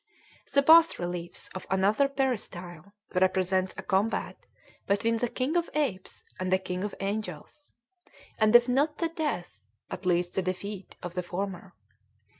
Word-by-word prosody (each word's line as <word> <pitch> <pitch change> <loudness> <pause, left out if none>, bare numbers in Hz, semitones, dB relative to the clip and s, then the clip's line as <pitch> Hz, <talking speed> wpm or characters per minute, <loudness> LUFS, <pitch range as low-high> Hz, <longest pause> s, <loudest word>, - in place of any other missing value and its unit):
The 280 - +4
bass 325 +3 +7
reliefs 175 -1 -5
of 185 - -7
another 205 +9 +3
peristyle 200 - -3 0.2
represent 185 0 +2
a - - -5
combat 200 +4 0 0.5
between 225 +3 +2
the 245 +2 0
king 260 +7 -2
of 345 -1 +1
apes 255 -12 -2 0.2
and 185 0 -2
the 185 - +5
king 185 0 -4
of 205 - -4
angels, 215 +8 -5 0.7
and 215 +1 +4
if 240 +1 +8
not 285 +4 +1
the 335 - 0
death, 295 - -3 0.3
at 180 0 -5
least 175 0 +1
the 190 - +1
defeat, 185 +2 -5
of 175 -1 -5
the 180 - -1
former. 185 +1 -5
195 Hz, 150 wpm, -28 LUFS, 185-250 Hz, 0.7 s, if